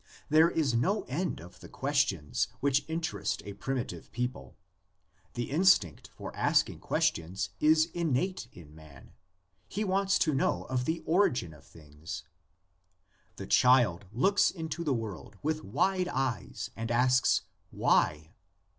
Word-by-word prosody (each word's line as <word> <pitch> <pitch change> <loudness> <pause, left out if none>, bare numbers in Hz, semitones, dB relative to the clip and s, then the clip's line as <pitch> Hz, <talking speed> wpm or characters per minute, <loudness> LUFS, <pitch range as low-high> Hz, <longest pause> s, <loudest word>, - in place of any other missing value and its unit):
There 160 +2 +6
is 150 -8 0
no 190 - +1
end 175 +8 -3
of 90 +2 -13
the - - -12
questions 135 - 0
which 140 0 +1
interest 160 - -3
a 100 - -6
primi 125 +5 -2
tive - - -10
people. 125 +2 -4 0.8
The 120 +1 -3
instinct 150 - +3
for - - -8
asking - - +1
questions 90 +3 -1
is 155 +1 +5
innate 170 -3 -1
in 75 -4 -14
man: 75 -5 -15 0.6
he 210 - -3
wants 195 0 +2
to 155 - +1
know 135 - 0
of 125 -1 -2
the 165 +4 -2
origin 160 - +1
of 75 - -17
things. 80 +1 -9 1.1
The - - -7
child 120 -8 +4
looks 195 - +3
into 165 -1 -5
the 150 - 0
world 110 -2 -6
with 155 +1 -1
wide 185 - 0
eyes 130 - -3
and 115 0 -4
asks, 125 +2 +3 0.3
Why? 80 +3 +1
125 Hz, 135 wpm, -30 LUFS, 95-160 Hz, 1.1 s, There